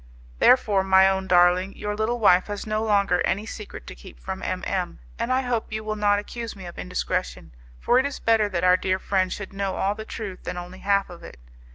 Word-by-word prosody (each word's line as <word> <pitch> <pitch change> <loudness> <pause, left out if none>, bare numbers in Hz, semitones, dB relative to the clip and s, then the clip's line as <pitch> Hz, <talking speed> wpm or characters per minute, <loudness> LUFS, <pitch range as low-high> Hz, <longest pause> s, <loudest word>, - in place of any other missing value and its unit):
Therefore, 210 -6 +4
my 190 0 +5
own 190 0 0
darling, 180 +2 +3
your 210 0 -3
little 220 +3 -1
wife 185 -4 +5
has 205 -1 -5
no 215 0 -1
longer 200 -4 +2
any 205 +3 0
secret 210 - -9
to - - -8
keep - - -14
from - - -6
M - - -3
M, - - -2 0.2
and 245 - -1
I 260 +1 +2
hope 245 -4 -2
you 215 0 -4
will 215 0 -3
not 205 -1 +2
accuse 230 +3 -6
me 190 -2 -10
of 175 - -9
indiscretion, 180 - -3 0.3
for 245 - +3
it 260 - +1
is 280 - -6
better 225 -2 +2
that 180 -3 -2
our 180 0 +5
dear 185 0 0
friend 190 -1 0
should 205 -1 -6
know 195 -1 -2
all 195 +1 0
the 220 +1 -7
truth 205 -4 -7
than 180 - -5
only 180 +1 -8
half 200 -1 +1
of 175 - -11
it. - - -11
200 Hz, 230 wpm, -24 LUFS, 185-215 Hz, 0.3 s, my